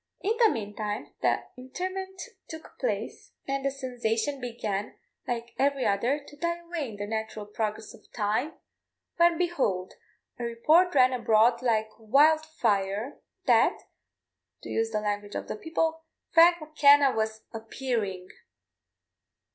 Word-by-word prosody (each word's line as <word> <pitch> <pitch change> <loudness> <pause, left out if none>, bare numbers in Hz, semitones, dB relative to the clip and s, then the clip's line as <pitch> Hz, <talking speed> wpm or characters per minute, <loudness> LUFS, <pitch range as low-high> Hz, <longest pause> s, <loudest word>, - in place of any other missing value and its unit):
In 430 +4 0
the 450 - +7
meantime 210 - -4
the - - +1
interment 370 +8 -5 0.3
took 320 -1 -11
place, - - -3
and 275 0 -2
the 275 - +2
sensation 255 0 -2
began, 215 -4 -4 0.3
like 235 -1 -4
every 275 -1 +2
other, 235 +8 +1
to 290 - -13
die 340 +2 -1
away 340 -5 -5
in 215 - -9
the 205 0 -4
natural 220 0 -4
progress 215 +1 -4
of - - -19
time, 220 +8 -1 0.6
when, 340 0 +4
behold, 265 - -1 0.5
a - - -4
report 305 +10 +3
ran 255 -1 +5
abroad 235 0 +3
like 220 -3 +1
wild 290 +8 +4
fire 215 -5 -1 0.2
that, - - +4 0.9
to - - -8
use 225 0 0
the 215 -1 -2
language 205 0 -3
of - - -4
the - - -4
people, 320 +5 -2 0.3
"Frank 340 +1 +6
M'Kenna 290 -3 +5
was 220 0 -2
appearing!" 225 -5 -3
245 Hz, 135 wpm, -28 LUFS, 215-310 Hz, 0.9 s, the